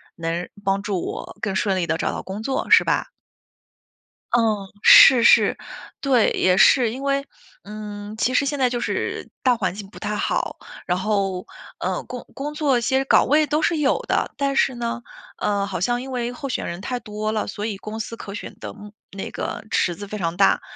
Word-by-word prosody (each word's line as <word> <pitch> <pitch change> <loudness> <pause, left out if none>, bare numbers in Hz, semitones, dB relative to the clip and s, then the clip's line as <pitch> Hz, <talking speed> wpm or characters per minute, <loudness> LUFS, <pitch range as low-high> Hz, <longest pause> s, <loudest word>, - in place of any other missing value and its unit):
能 165 +1 -3 0.2
帮 195 0 +1
助 200 -3 -2
我 - - -6
更 195 -2 -2
顺 190 0 +1
利 175 -2 -1
地 160 +1 0
找 - - -1
到 - - -5
工 200 +3 -6
作， 265 +2 -2
是 - - +8
吧？ - - 0 1.3
嗯， 215 -4 +2
是 245 0 +9
是。 - - +5 0.4
对， 260 -5 +3
也 185 0 +2
是， 235 +2 +5
因 255 +4 -6
为， 275 0 0 0.4
嗯， 210 0 -8
其 255 +3 +1
实 280 - +3
现 285 0 -2
在 255 - +3
就 240 0 -2
是 - - -3
大 255 -2 +3
环 190 -5 -1
境 200 -1 -9
不 - - -14
太 210 - -3
好， - - -1 0.3
然 180 0 0
后， 195 -2 -1 0.3
嗯， - - -2
工 - - -8
工 290 +2 -4
作 290 -5 +2
其 235 +3 0
实 270 - +1
岗 - - +4
位 300 +2 +3
都 300 +2 +1
是 335 - +2
有 290 -3 +2
的， - - 0
但 275 -1 0
是 265 -1 +2
呢， 235 0 -3 0.4
嗯， 200 -1 0
好 190 -2 -4
像 240 +7 0
因 265 - -8
为 245 -1 -2
候 275 +2 -6
选 - - -2
人 170 +1 -5
太 245 +4 -3
多 215 -1 -4
了， 215 -1 -2
所 205 0 -5
以 215 -3 -3
公 215 +3 -7
司 230 - -5
可 200 -2 -8
选 - - -8
的 - - -6
嗯， 210 0 -11 0.3
那 195 - -5
个 - - -5
池 175 - +1
子 205 - -8
非 210 - -5
常 170 -1 -2
大， 195 - +4
215 Hz, 225 characters per minute, -22 LUFS, 195-255 Hz, 1.3 s, 是